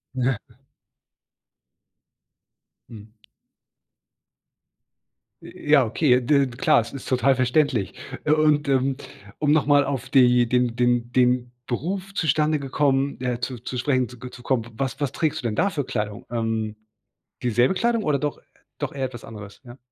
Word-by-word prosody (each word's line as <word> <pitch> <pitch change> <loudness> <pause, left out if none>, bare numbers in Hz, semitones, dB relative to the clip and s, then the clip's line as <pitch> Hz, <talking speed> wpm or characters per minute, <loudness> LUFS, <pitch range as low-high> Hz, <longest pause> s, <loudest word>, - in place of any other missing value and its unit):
Ja. 130 -2 +1 2.5
Mhm. 110 -1 -12 2.3
J - - -12 0.2
ja, 140 -5 +6
okay. 125 +2 +3
D 140 +2 +3
klar. - - +4
Das 115 - -9
ist 135 - -8
total 130 +1 +3
verständlich. 125 - +1 0.3
U 150 - +5
und, 150 -1 +2
ähm, 135 0 +2 0.4
um 150 -1 +2
noch 155 -2 +3
mal 145 -1 +5
auf 135 -3 -4
die 125 -2 +5
den 125 -1 +1
den 120 0 +1
den 125 -1 +2 0.2
Beruf 185 +10 -3
zustande 155 -2 +1
gekommen 135 0 0
äh, 125 -1 -2
zu 125 0 -4
zu 125 +1 -6
sprechen 130 -1 +1
zu 125 - -13
ge 125 +1 -8
zu 120 - -13
kommen. 120 -4 0
Was 135 +1 -3
was 140 - 0
trägst 155 -3 -1
du 120 - -2
denn 105 - -3
da 200 - +2
für 145 -8 -3
Kleidung? 105 -4 -4
Ähm, 115 -2 -2 0.7
dieselbe 120 - +2
Kleidung 230 +2 0
oder 145 -5 +1
doch 145 +1 -2
äh, - - -22 0.4
doch - - -4
eher 135 -1 -2
etwas 120 -3 -8
anderes? 105 0 -11
Ja? 120 +1 -12
130 Hz, 155 wpm, -23 LUFS, 120-145 Hz, 2.5 s, ja